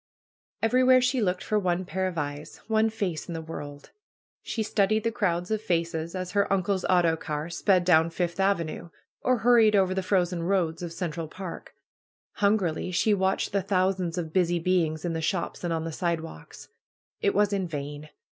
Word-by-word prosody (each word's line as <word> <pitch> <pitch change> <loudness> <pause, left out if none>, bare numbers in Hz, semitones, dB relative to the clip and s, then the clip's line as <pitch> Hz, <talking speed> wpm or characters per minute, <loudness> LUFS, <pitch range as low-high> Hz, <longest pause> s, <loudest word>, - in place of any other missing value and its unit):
Everywhere 255 +2 +5
she 250 0 +1
looked 180 -3 0
for 215 - +1
one 185 -1 -1
pair 185 +2 -1
of 180 -2 -5
eyes, 145 0 -5
one 220 0 +3
face 195 -8 -3
in 170 - -5
the - - -3
world. 145 -3 -8 0.5
She 225 - -3
studied 215 +1 +1
the 230 - 0
crowds 180 -5 -1
of 215 -1 0
faces, 170 -3 -2
as 185 -1 -4
her 200 -1 +1
uncle's 190 0 +1
autocar 165 -3 +1
sped 185 +1 +2
down 165 -2 +5
Fifth 170 +1 -3
Avenue, 170 -4 0 0.3
or 255 0 +2
hurried 225 -2 +5
over 190 -2 +3
the 190 - -1
frozen 180 -2 0
roads 170 -2 0
of 175 -2 -5
Central 165 -2 -4
Park. 185 +2 -8 0.6
Hungrily 200 -6 +1
she 195 +4 +2
watched 190 -1 0
the 200 - +1
thousands 185 -2 0
of 160 -3 -4
busy 175 -2 +2
beings 165 -2 0
in 170 - -1
the 160 - -2
shops 170 +3 -2
and 175 - -1
on 165 -1 -1
the 165 - -4
sidewalks. 165 - -5 0.5
It 200 - +1
was 205 0 +3
in 190 -2 -1
vain. 145 -1 -6
180 Hz, 180 wpm, -27 LUFS, 165-200 Hz, 0.6 s, Everywhere